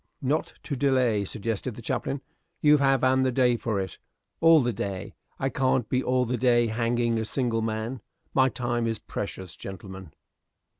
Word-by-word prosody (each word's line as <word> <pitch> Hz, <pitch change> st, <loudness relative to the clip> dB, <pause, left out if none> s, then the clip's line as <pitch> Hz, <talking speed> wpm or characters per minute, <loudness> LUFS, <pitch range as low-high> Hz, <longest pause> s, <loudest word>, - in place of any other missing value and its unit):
"Not 145 Hz, +4 st, 0 dB
to 145 Hz, -, -3 dB
delay," 130 Hz, -6 st, +2 dB
suggested 110 Hz, +3 st, -3 dB
the 120 Hz, -, -9 dB
chaplain. 135 Hz, +4 st, -2 dB, 0.4 s
"You 150 Hz, -1 st, +6 dB
have 135 Hz, -2 st, +2 dB
an 130 Hz, 0 st, +4 dB
the 130 Hz, 0 st, +2 dB
day 125 Hz, -1 st, +3 dB
for 115 Hz, -4 st, -2 dB
it." 95 Hz, -2 st, -5 dB, 0.4 s
"All 165 Hz, -1 st, +7 dB
the 120 Hz, -3 st, 0 dB
day! 95 Hz, -2 st, -4 dB, 0.2 s
I 135 Hz, -, 0 dB
can't 130 Hz, -3 st, +1 dB
be 130 Hz, -, +1 dB
all 125 Hz, 0 st, +2 dB
the 125 Hz, +1 st, -1 dB
day 120 Hz, -1 st, +4 dB
hanging 115 Hz, 0 st, +1 dB
a -, -, -1 dB
single 115 Hz, 0 st, 0 dB
man. 110 Hz, +2 st, -3 dB, 0.3 s
My 130 Hz, -1 st, +4 dB
time 120 Hz, -2 st, -1 dB
is 115 Hz, -1 st, -1 dB
precious, 95 Hz, -4 st, -6 dB
gentlemen." 95 Hz, -2 st, -9 dB
120 Hz, 170 wpm, -27 LUFS, 110-130 Hz, 0.4 s, All